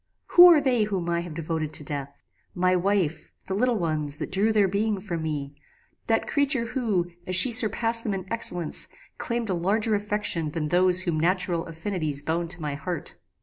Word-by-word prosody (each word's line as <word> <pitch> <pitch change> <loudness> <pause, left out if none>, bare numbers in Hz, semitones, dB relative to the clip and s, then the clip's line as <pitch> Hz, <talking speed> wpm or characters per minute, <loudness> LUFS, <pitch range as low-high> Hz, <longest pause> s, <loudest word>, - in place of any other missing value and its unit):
"Who 355 0 +9
are 320 - +6
they 250 -6 +1
whom 190 -5 -3
I 170 - +1
have 170 -2 -7
devoted 160 -1 -3
to 150 - +1
death? 140 -1 -7 0.3
My 185 +1 +2
wife 180 -3 -1
the 190 - -4
little 240 +3 +1
ones, 155 -5 -2
that 155 - -6
drew 200 +4 +1
their 210 -2 +3
being 205 +2 -1
from 175 -4 -5
me 145 -3 -4 0.5
that 225 0 +1
creature 280 -4 +2
who, 215 -8 -1 0.2
as 185 - +1
she 240 +8 +6
surpassed 230 0 +2
them 205 -3 -2
in 185 -2 -6
excellence, 180 -8 +1 0.3
claimed 235 -3 -2
a - - +1
larger 210 +6 0
affection 205 -6 -1
than 150 -2 -2
those 180 +2 +2
whom 170 -4 -1
natural 175 0 0
affinities 160 -4 -4
bound 165 +2 -2
to 175 0 -1
my 150 -1 -2
heart. 175 +4 -5
185 Hz, 190 wpm, -25 LUFS, 165-215 Hz, 0.5 s, Who